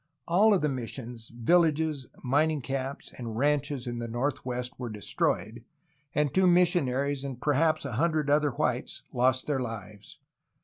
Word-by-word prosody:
All 195 +6 +5
of 185 - 0
the - - +3
missions, 120 -3 -5
villages, 155 +2 +2 0.2
mining 145 +3 +2
camps, 135 +1 -4
and 115 -3 -5
ranches 145 -1 +1
in 120 -1 -4
the 120 - -4
northwest 125 0 -2
were 125 -2 -4
destroyed, 110 +1 -2 0.5
and 150 -2 +1
two 190 0 +4
mis 175 0 +5
sionaries 140 -2 0
and 135 -3 -5
perhaps 155 +2 +2
a 140 - -3
hundred 155 +3 +1
other 145 +1 +3
whites 120 - -2
lost 130 +1 +2
their 145 -3 0
Hves. 105 -4 -7
135 Hz, 150 wpm, -28 LUFS, 120-150 Hz, 0.5 s, All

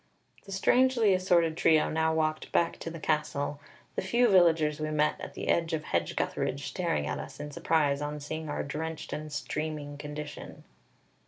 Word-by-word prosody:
The 195 - -10
strangely 235 +2 +4
assorted 175 -3 +3
trio 160 -2 +4
now 160 0 +2
walked 155 -1 -1
back 170 - +1
to - - -5
the 165 0 -7
castle, 150 -2 -1 0.4
the - - 0
few 235 +6 +3
villagers 165 -5 +4
we 155 0 -2
met 150 0 +1
at - - -8
the - - -5
edge 165 -1 +1
of 155 -1 -1
Hedge - - -1
gutheridge 140 +1 -2
staring 130 - -1
at - - -3
us - - -8
in 145 0 -6
surprise 145 -2 +1
on 150 0 -3
seeing 155 +2 -5
our 145 - -2
drenched 160 +3 -5
and 155 0 -5
streaming 145 -1 -4
condition. 150 0 -7
155 Hz, 175 wpm, -29 LUFS, 150-165 Hz, 0.4 s, strangely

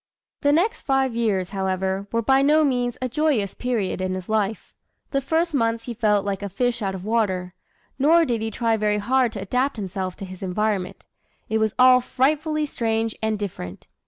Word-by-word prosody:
The 285 - +3
next 365 +10 +1
five 270 -2 +1
years, 205 -6 0
however, 190 0 -2
were 230 0 0
by 265 +4 +4
no 305 +3 +4
means 245 -4 0
a - - +1
joyous 255 -7 0
period 225 -7 -2
in 185 0 -1
his 185 -1 -6
life. 215 -1 -1 0.3
In - - -45
the 275 - +1
first 325 +4 0
months 230 -3 0
he 240 - -5
felt 210 -3 +1
like 200 -1 -2
"a 200 - -4
fish 245 +4 -1
out 195 -2 -2
of 185 0 -8
water"; 190 -5 0 0.5
nor 325 +5 +5
did 235 -5 -1
he 225 - -1
try 225 +1 0
very 210 -1 +1
hard 245 +3 +2
to 205 - -5
adapt 250 +7 0
himself 190 -2 -4
to 195 - -7
his 185 -1 -10
environment. 195 0 -2 0.4
It 220 0 +1
was 220 -1 0
all 255 0 +7
frightfully 305 +5 0
strange 225 -4 -1
and 220 -1 0
different. 170 - -6
225 Hz, 195 wpm, -23 LUFS, 195-260 Hz, 0.5 s, all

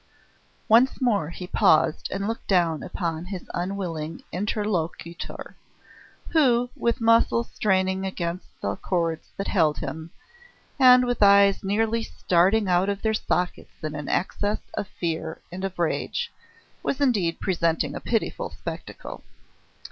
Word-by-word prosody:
Once 235 +4 +5
more 210 - +1
he 180 +2 -7
paused 155 -3 +3
and 195 +1 -3
looked 225 +1 -4
down 170 -5 +2
upon 165 -2 -3
his 185 -1 -7
unwilling 175 -4 -4
interlocutor, 180 -4 -3 0.7
who, 245 -6 +3
with 235 +2 0
muscles 230 0 +3
straining 190 -2 +1
against 180 -2 -3
the - - -1
cords 165 -3 -2
that 195 - -3
held 160 -6 +2
him, 160 +1 -5 0.7
and 250 -1 +8
with 245 -2 -2
eyes 200 -1 +6
nearly 220 +3 +1
starting 195 +1 +2
out 180 +2 +2
of 200 0 -3
their 220 -1 +2
sockets 180 -5 -2
in 155 -1 -3
an 150 -1 -5
access 205 +3 -1
of 205 - -3
fear 160 -2 -4
and 185 +2 -6
of 195 -1 -4
rage, 320 - -1 0.5
was 275 - -2
indeed 205 -12 +1
presenting 170 -3 0
a - - -4
pitiful 225 -2 -1
spectacle. - - -8
190 Hz, 135 wpm, -25 LUFS, 170-220 Hz, 0.7 s, and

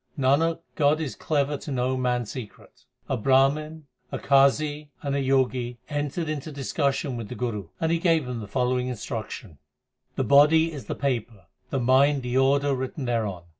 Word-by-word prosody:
Nanak, 155 +5 +2
God 150 0 +2
is 155 -5 -3
clever 145 -1 -1
to 145 - -8
know 130 0 0
man 125 -1 0
s 105 - -8
secret. 120 -6 -10 0.2
A - - 0
Brahman, 145 +6 +2 0.3
a - - -2
Qazi, 145 +2 +2 0.2
and 140 -1 -1
a 140 - 0
Jogi 130 -2 +1
entered 145 +3 -2
into 155 0 -4
dis 140 -2 -6
cussion 140 -2 0
with 115 -3 -6
the - - -6
Guru, 110 -7 -3
and 160 0 0
he 170 - +2
gave 165 -4 +2
them 125 -2 -4
the 105 - -7
following 125 +2 0
instruction: 110 - -6 0.6
The - - 0
body 155 +4 +5
is 140 - -7
the - - -4
paper, 115 -8 -3 0.2
the 135 - -1
mind 135 +3 +3
the 125 0 -3
order 140 +2 +3
written 130 +2 -4
thereon. 110 -7 -2
135 Hz, 180 wpm, -25 LUFS, 125-145 Hz, 0.6 s, body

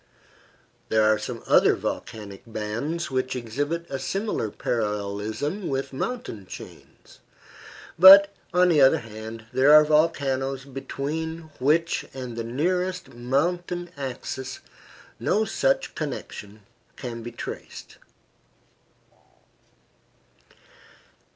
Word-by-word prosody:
There 110 -1 +3
are 110 0 +4
some - - -6
other - - +5
volcanic 100 -3 -5
bands 115 +10 -3
which 130 0 -1
exhibit 145 +8 -3
a 135 - -4
similar 195 - -2
parallelism 110 - -2
with 135 0 -3
mountain 130 - -4
chains; - - -12 0.8
but, 200 +2 +10 0.2
on 180 0 +4
the 155 -4 +4
other 135 - +6
hand, 110 0 -9
there 130 +3 +5
are 150 0 +9
volcanoes 135 -4 +1
between 155 +4 -5
which 160 +6 +2
and 125 -3 -6
the 115 - -3
nearest 180 +9 -1
mountain 175 +8 -1
axis 130 -1 -5 0.6
no 220 +1 +1
such - - 0
connection 110 -8 -6 0.3
can 120 -3 -6
be 120 +1 -7
traced. 120 - -8
135 Hz, 100 wpm, -25 LUFS, 115-165 Hz, 0.8 s, but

